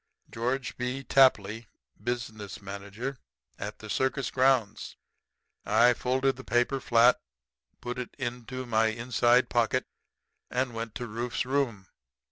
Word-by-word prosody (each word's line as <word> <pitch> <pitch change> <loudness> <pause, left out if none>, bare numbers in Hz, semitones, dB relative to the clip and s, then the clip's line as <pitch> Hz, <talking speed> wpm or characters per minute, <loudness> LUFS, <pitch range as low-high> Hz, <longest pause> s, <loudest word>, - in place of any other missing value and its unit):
Geo. 120 +4 0 0.2
B. 125 +2 -2
Tapley, 115 -5 +3 0.4
Business 110 -4 -4
Manager. 100 +6 -6 0.4
At 105 +2 -5
the 110 - -10
circus 130 +4 0
grounds. 125 -5 +1 0.7
"I 120 +1 +5
folded 130 +3 +1
up 135 - 0
the 130 - -9
paper 120 +3 +1
flat, 120 0 +5 0.6
put 125 +1 -4
it 125 - -6
into 125 0 -4
my 110 -2 +2
inside 120 +2 +2
pocket, 120 +2 +1 0.6
and 125 0 -1
went 115 -1 -5
to 120 - -4
Rufe's 120 +3 -3
room. 130 -7 -1
120 Hz, 125 wpm, -28 LUFS, 110-130 Hz, 0.7 s, I